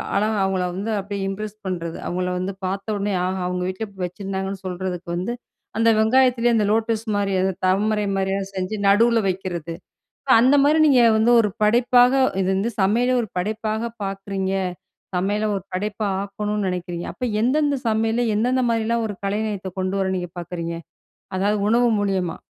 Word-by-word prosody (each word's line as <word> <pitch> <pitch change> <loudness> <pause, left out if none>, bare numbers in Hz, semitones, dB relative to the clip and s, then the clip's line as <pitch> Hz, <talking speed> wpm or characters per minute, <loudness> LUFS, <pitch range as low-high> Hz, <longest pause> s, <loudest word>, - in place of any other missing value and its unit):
அழகா 215 +1 +1
அவங்கள 190 -1 0
வந்து 200 +4 -3
அப்டியே 200 0 -5
இம்ப்ரெஸ் 210 +1 -5
பண்றது, 170 -3 -3
அவங்கள 180 +1 -2
வந்து 190 +2 -3
பார்த்தோனே 200 +1 -2
ஆஹா! 185 0 -2
அவங்க 180 0 -2
வீட்ல 185 +4 -4 0.2
வச்சிருந்தாங்கன்னு 190 +1 -5
சொல்றதுக்கு 180 -1 -4
வந்து, 185 +7 -2 0.4
அந்த 225 0 +4
வெங்காயத்திலேயே 240 +1 +3
அந்த 210 - +2
லோட்டஸ் 225 0 0
மாரி 200 -1 0
அந்த 190 0 +1
தமரை 210 +2 +1
மாதிரியெல்லாம் 195 0 -1
செஞ்சு 185 +3 -2
நடுவுல 230 +3 +5
வக்கிறது. 175 -3 -4 0.7
அந்த 265 +4 +5
மாரி 305 +2 +4
நீங்க 265 -4 +5 0.2
வந்து 225 +2 +3
ஒரு 210 - +2
படைப்பாக, 245 +3 +5 0.3
இது 185 - 0
வந்து 215 +5 0
சமையலே 240 +6 +2
ஒரு 220 - -5
படைப்பாக 220 +4 -2
பார்க்குறீங்க, 195 -1 -3 0.6
சமையல 205 +4 0
ஒரு 190 - -5
படைப்பா 210 +2 -2 0.2
ஆக்கணும்னு 205 0 -3
நெனைக்கிறீங்க, 175 -1 -4
அப்ப 250 - -4 0.2
எந்தெந்த 285 +3 +2
சமையல்ல? 225 +2 +1
எந்தெந்த 250 +4 +1
மாரிலாம்? 230 0 0
ஒரு 205 - -6
கலைநயத்தை 205 -2 -2
கொண்டு 185 +1 -1
வர 190 - 0
நீங்க 180 -2 -4
பார்க்குறீங்க. 170 -1 -4 0.6
அதாவது 205 +2 +1
உணவு 240 0 +4
மூலியமா? 190 -4 -1
205 Hz, 150 wpm, -22 LUFS, 190-225 Hz, 0.7 s, நடுவுல